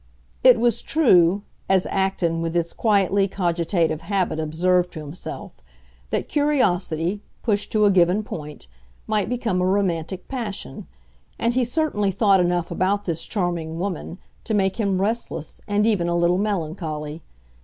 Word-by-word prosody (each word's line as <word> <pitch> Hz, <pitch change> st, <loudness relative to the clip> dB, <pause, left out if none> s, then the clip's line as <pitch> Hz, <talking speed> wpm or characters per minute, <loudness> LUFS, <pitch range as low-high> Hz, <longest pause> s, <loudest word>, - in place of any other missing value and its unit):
It -, -, +7 dB
was 240 Hz, -2 st, +2 dB
true, 200 Hz, -, +4 dB, 0.3 s
as 190 Hz, -1 st, +3 dB
Acton 190 Hz, -4 st, 0 dB
with 165 Hz, 0 st, -3 dB
his 170 Hz, -1 st, 0 dB
quietly 200 Hz, -2 st, +2 dB
cogitative 170 Hz, -3 st, 0 dB
habit 185 Hz, -3 st, -1 dB
observed 175 Hz, +3 st, +1 dB
to 160 Hz, -, -6 dB
himself, 155 Hz, +4 st, -7 dB, 0.6 s
that -, -, -2 dB
curiosity, 200 Hz, -, +1 dB, 0.2 s
pushed 210 Hz, -3 st, 0 dB
to 215 Hz, -1 st, +4 dB
a 205 Hz, -, +5 dB
given 185 Hz, +3 st, +3 dB
point, 150 Hz, -6 st, -8 dB, 0.4 s
might 215 Hz, -2 st, 0 dB
become 230 Hz, -7 st, -1 dB
a -, -, +2 dB
romantic 185 Hz, -2 st, -1 dB
passion; 230 Hz, -7 st, -5 dB, 0.5 s
and 235 Hz, +1 st, +1 dB
he 255 Hz, +1 st, +2 dB
certainly 240 Hz, -6 st, 0 dB
thought 195 Hz, 0 st, +3 dB
enough 175 Hz, -1 st, 0 dB
about 190 Hz, +4 st, 0 dB
this 165 Hz, -3 st, 0 dB
charming 170 Hz, -5 st, -2 dB
woman 180 Hz, -1 st, -4 dB, 0.3 s
to 220 Hz, -, -1 dB
make 190 Hz, -2 st, +1 dB
him 200 Hz, -4 st, 0 dB
restless 205 Hz, -6 st, -3 dB
and 205 Hz, +1 st, +2 dB
even 205 Hz, -6 st, +2 dB
a 175 Hz, 0 st, +1 dB
little 175 Hz, +1 st, +2 dB
melancholy. 160 Hz, -6 st, -3 dB
185 Hz, 145 wpm, -23 LUFS, 170-210 Hz, 0.6 s, It